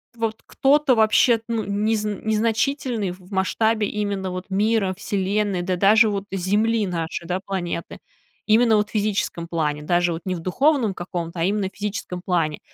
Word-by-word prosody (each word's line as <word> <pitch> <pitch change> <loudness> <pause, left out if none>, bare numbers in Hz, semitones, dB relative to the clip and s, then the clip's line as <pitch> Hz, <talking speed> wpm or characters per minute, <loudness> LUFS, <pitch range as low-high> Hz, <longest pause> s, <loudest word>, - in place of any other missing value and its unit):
вот 225 -1 -3
кто-то 280 -1 +3
вообще, 225 +1 +4
ну, 230 -2 -1
незн 210 0 -1
незначительный 225 0 0
в 185 +2 -14
масштабе 215 +3 +1
именно 200 -2 -2
вот 185 +1 -6
мира, 205 -1 +1
Вселенной, 200 -2 -1
да 185 +1 -1
даже 215 +4 +5
вот 200 -1 -3
Земли 210 +4 +1
нашей, 170 -1 -4
да, 180 +1 -1
планеты. 175 -3 -4 0.5
Именно 225 +1 +4
вот 210 0 +1
в - - -17
физическом 205 -5 -1
плане, 150 -3 -2
даже 175 +1 +2
вот 165 0 -4
не 185 -1 -1
в - - -5
духовном 245 - +2
каком-то, 175 -1 -5
а 165 - +1
именно 195 0 0
в - - -31
физическом 200 -3 -4
плане. 165 -5 0
200 Hz, 165 wpm, -22 LUFS, 180-220 Hz, 0.5 s, даже